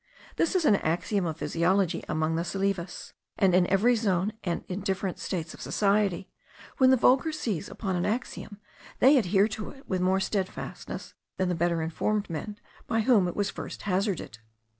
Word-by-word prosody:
This 335 - +1
is 355 -4 +2
an 210 -7 +5
axiom 175 +4 0
of 160 -1 -4
physiology 175 +1 +1
among 155 +1 0
the 165 - 0
Salives; 195 0 -3 0.2
and 190 -2 +3
in 180 0 +4
every 225 +6 +3
zone, 200 -2 0
and 175 -3 -2
in 185 +1 -4
different 190 -1 -2
states 165 -4 -4
of - - -12
society, 200 -3 +1 0.5
when 260 -1 +6
the 260 - +6
vulgar 265 +6 +4
seize 210 - -3
upon 190 -4 -3
an 175 - 0
axiom, 215 -2 -4 0.4
they 270 +2 +6
adhere 200 -1 +3
to 215 -1 -5
it 270 0 -15
with 185 -2 -1
more 190 +1 +2
stedfastness 190 -1 -4 0.2
than 185 -1 0
the - - +1
better 170 -1 0
informed 200 +5 -1
men 205 +6 -5 0.3
by 225 -1 +1
whom 215 -6 +4
it 175 - -4
was 205 -1 0
first - - -7
hazarded. 190 - -1
195 Hz, 180 wpm, -28 LUFS, 175-215 Hz, 0.5 s, when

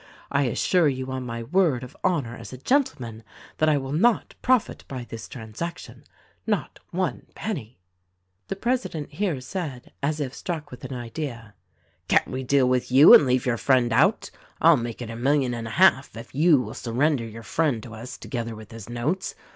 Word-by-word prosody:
I 140 0 +2
assure 160 +6 +2
you 130 -1 -4
on 130 -1 -4
my 115 0 -4
word 155 -3 +2
of 125 - -10
honor 135 -10 0
as - - -10
a 130 - -7
gentleman 135 - 0 0.4
that 155 - +4
I 150 - +3
will 135 -1 -4
not 220 +10 +2
profit 255 -3 +1
by 130 -3 -5
this 115 -1 -8
transaction 125 +9 -7 0.2
— - - -36
not - - -12
one 175 -6 -2
penny." 130 - -5 0.7
"The - - -3
president 230 - -2
here 185 -8 -1
said, 135 -3 -6
— - - -46
as 150 +2 -1
if 135 -3 -3
struck 160 -2 -5
with 125 - -11
an - - -6
idea, 120 -3 -6 0.3
— - - -41
"Can't - - +3
we 130 - -3
deal 130 0 +3
with 125 0 0
you 135 +4 +9
and 145 - +8
leave 125 0 +2
your 120 -2 +1
friend 125 -1 +3
out? 155 - +3 0.3
I'll 165 0 +7
make 120 -1 -4
it 115 - -6
a - - -6
million 130 +1 +1
and 115 -1 -4
a 110 - -6
half 155 -10 +4
if 115 +2 -10
you 150 +1 +5
will 115 -2 -5
surrender 130 +2 0
your 115 +1 -9
friend 140 -5 0
to 115 - -10
us 115 +3 -8
together 115 -3 -5
with 110 -1 -12
his 115 -2 -9
notes. 130 +11 -2
130 Hz, 200 wpm, -25 LUFS, 120-155 Hz, 0.7 s, you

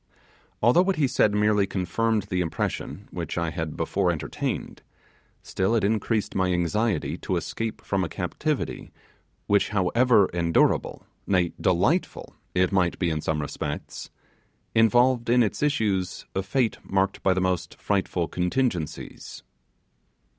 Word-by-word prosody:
Although 120 +10 +6
what 190 +1 +1
he 150 -4 +2
said 120 -4 +3
merely 105 -1 +3
confirmed 105 +4 0
the 95 -2 -2
impression 85 -2 -3
which - - -5
I 85 -1 -1
had 80 -3 -4
before 90 +3 0
entertained, 85 -3 -3 0.6
still 95 +5 0
it 110 - +1
increased 110 +1 0
my 95 -1 +1
anxiety 90 +2 0
to - - -2
escape 115 -1 -4
from 95 -1 0
a 85 - -3
captivity - - -3 0.5
which, 100 0 +2
however 105 +3 +3
endurable, 85 -1 +1 0.2
nay, 90 -3 +2
delightful 100 - 0 0.2
it 90 0 +3
might 90 -3 +1
be 85 -3 0
in 80 -1 -2
some 75 -1 -1
respects, 75 0 -5 0.6
involved 120 +2 +4
in 125 0 +5
its 105 - -2
issues 105 -11 0
a 95 - 0
fate 115 +4 0
marked 95 0 0
by 95 -1 +2
the - - +1
most 95 -2 -1
frightful 95 -4 0
contingencies. 90 - -3
95 Hz, 135 wpm, -25 LUFS, 90-115 Hz, 0.6 s, Although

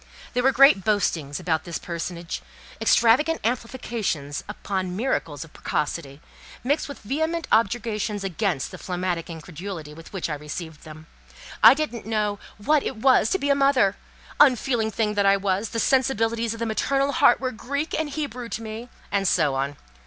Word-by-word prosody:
There 245 - +1
were 265 +2 +4
great 275 -6 +6
boastings 165 -9 0
about 160 -2 0
this 170 -2 -4
personage, 170 0 -5 0.4
extravagant 240 +8 +4
amplifications 230 - -2
upon 190 -3 -3
miracles 185 - -2
of 165 - -16
precocity, 145 -1 -3 0.4
mixed 285 +4 0
with 285 - -7
vehement 315 +8 -1
objurgations 215 -2 +1
against 195 - -1
the - - -9
phlegmatic 180 -2 -3
incredulity 165 0 -7
with 165 +2 -13
which 190 -3 -3
I 155 - -3
received 150 +2 -7
them. 155 0 -11 0.6
I 225 +4 +9
didn't 260 -8 -4
know 210 -2 0 0.2
"what 290 +8 +2
it - - -4
was 240 -1 +4
to - - +2
be 285 -5 0
a - - +7
mother;" 275 -8 +3 0.4
"unfeeling 250 -5 +4
thing 215 0 -1
that 200 -1 +2
I 195 0 +5
was, 195 +2 -1
the 230 - -3
sensibilities 230 -3 +1
of - - -11
the 230 - -1
maternal 275 +5 +1
heart 280 -5 +5
were 255 -1 -2
Greek 280 +6 -4
and 315 -2 -1
Hebrew 275 -5 -4
to 225 - -4
me," 225 +2 -7 0.2
and 195 -1 +1
so 145 -4 +3
on. 135 +2 -2
215 Hz, 165 wpm, -24 LUFS, 175-255 Hz, 0.6 s, I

